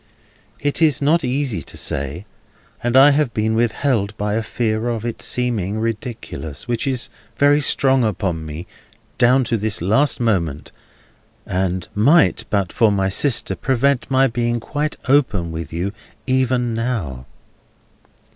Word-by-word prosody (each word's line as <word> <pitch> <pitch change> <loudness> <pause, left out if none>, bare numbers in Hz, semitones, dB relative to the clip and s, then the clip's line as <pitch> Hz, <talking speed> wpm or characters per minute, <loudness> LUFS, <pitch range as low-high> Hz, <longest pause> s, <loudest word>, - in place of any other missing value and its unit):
It 145 +3 -1
is 155 -4 +4
not 155 +4 +2
easy 130 - -1
to - - -9
say, 70 +8 -3 0.6
and 120 +1 +1
I 140 +2 +8
have 145 -4 0
been 110 +1 0
withheld 115 -2 0
by 105 0 -1
a 115 - 0
fear 110 +1 -1
of 115 -1 -3
its 120 - -4
seeming 110 -5 -1
ridiculous, 110 - -5
which 120 +3 -1
is 130 -3 -2 0.3
very 145 +1 +4
strong 135 -2 +3
upon 95 -6 -1
me 80 +3 -7 0.5
down 125 +2 +4
to 115 -1 -1
this 105 0 -1
last 110 - +1
moment, 85 - -1 0.7
and 90 -1 -2
might, 145 +10 +3
but 100 -4 -1
for 115 -3 +3
my 95 -1 +1
sister, 130 +6 +1
prevent 135 0 0
my 135 0 +4
being 120 -1 -1
quite 150 +6 -3
open 110 - +2
with 80 -2 -6
you 85 +4 -2 0.3
even 130 -2 +1
now. 110 - -3
115 Hz, 145 wpm, -20 LUFS, 100-130 Hz, 0.7 s, I